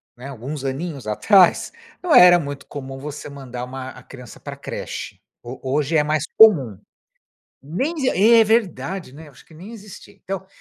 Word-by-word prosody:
né, 125 +3 -10
alguns 135 +2 -7
aninhos 135 -2 -5
atrás, 185 - +3 0.3
não 350 -4 0
era 180 0 +8
muito 140 -2 -7
comum 135 -2 -8
você 150 +1 -8
mandar 130 -3 -8
uma 130 0 -8
a - - -13
criança 125 -4 -13
pra - - -8
creche, - - -7 0.2
ho 120 +2 -9
hoje 145 +4 0
é 150 - +3
mais 155 0 -1
comum. 140 - +5 0.8
Nem 225 - -3
exi, 265 -4 0 0.3
é - - +5
verdade, 190 - -1
né, 155 +1 -12
acho 135 - -19
que - - -21
nem 190 +8 -11
existia. 210 -3 -13
Então, 190 0 -7
150 Hz, 170 wpm, -21 LUFS, 130-185 Hz, 0.8 s, era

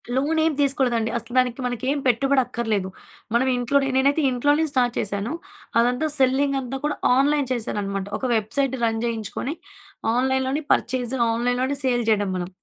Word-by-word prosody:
Loan 295 +5 +1
ఏం 320 - +3
తీసుకోలేదండి 260 -5 +1
అసలు 235 +1 -8
దానికి 255 0 +2
మనకేం 250 +3 -1
పెట్టుబడి 270 +3 +3
అక్కర్లేదు. 225 -6 -2 0.4
మనం 245 +3 +2
ఇంట్లో 245 +3 +1 0.2
నేనైతే 280 +4 +3
ఇంట్లోనే 290 +5 +2
స్టార్ట్ 245 -3 +1
చేశాను. 200 +3 -2 0.5
అదంతా 250 +6 +2
సెల్లింగ్ 270 +1 +2
అంతా 260 +1 -5
కూడా 300 0 0 0.2
ఆన్‌లైన్ 285 0 +2
చేశానన్నమాట. 200 -4 -3
ఒక - - -4
వెబ్సైట్ 260 +5 0
రన్ 225 -1 +1
జేయించుకొని 230 +4 -3 0.6
ఆన్‌లైన్లోనే 265 +3 0
పర్చేజ్, 250 0 0 0.2
ఆన్‌లైన్‌లోనే 245 +4 0
సేల్ 245 -2 +1
జేయడం 205 -2 +2
మనం. 175 -1 -3
250 Hz, 145 wpm, -23 LUFS, 230-275 Hz, 0.6 s, ఏం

